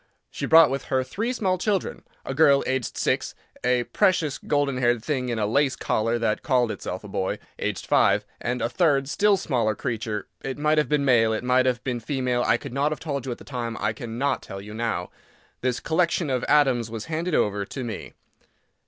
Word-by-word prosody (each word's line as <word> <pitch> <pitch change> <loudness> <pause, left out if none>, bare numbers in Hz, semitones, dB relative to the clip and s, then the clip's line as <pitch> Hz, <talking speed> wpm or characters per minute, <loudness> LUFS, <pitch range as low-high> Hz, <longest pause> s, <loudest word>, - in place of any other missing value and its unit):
She - - -4
brought 160 -4 +7
with 135 0 -3
her 130 0 0
three 225 - -3
small 190 -7 0
children: 200 -1 -1 0.2
a - - -3
girl, 140 -1 +5
aged 130 -2 -2
six; - - 0 0.3
a 125 -1 +2
precious, 160 -1 +1
golden 145 -3 0
haired 120 -2 +1
thing 130 -5 -1
in 120 - -1
a 105 - +1
lace 135 +5 +2
collar 115 +2 0
that 115 -2 0
called 125 -6 +2
itself 95 -2 -5
a - - -8
boy, 95 -1 -2 0.2
aged - - -3
five; - - +3 0.2
and 125 +1 -2
a - - +2
third 140 -2 +2
still 200 +6 +3
smaller 115 - 0
creature, 110 -2 -3
it 135 -1 -4
might 150 +1 +2
have 150 - 0
been 150 -1 +2
male, 115 -4 +4
it 110 - -3
might 130 +1 +3
have 125 -1 0
been 125 -2 -2
female; 125 0 -1
I 120 - +3
could 130 0 -9
not 140 +3 +1
have 155 - -3
told 140 -4 -4
you - - -2
at 120 - -4
the - - -13
time, 120 -4 -4
I 110 - 0
cannot 120 +5 -2
tell 95 - -8
you 105 +2 -9
now. 110 -6 -2 0.5
This 125 -1 0
collection 165 -2 0
of 125 -1 0
atoms 130 -6 +3
was 110 -1 -6
handed 165 +1 -2
over 100 -1 +1
to 130 +6 -6
me. 115 -3 -6
130 Hz, 210 wpm, -25 LUFS, 115-150 Hz, 0.5 s, brought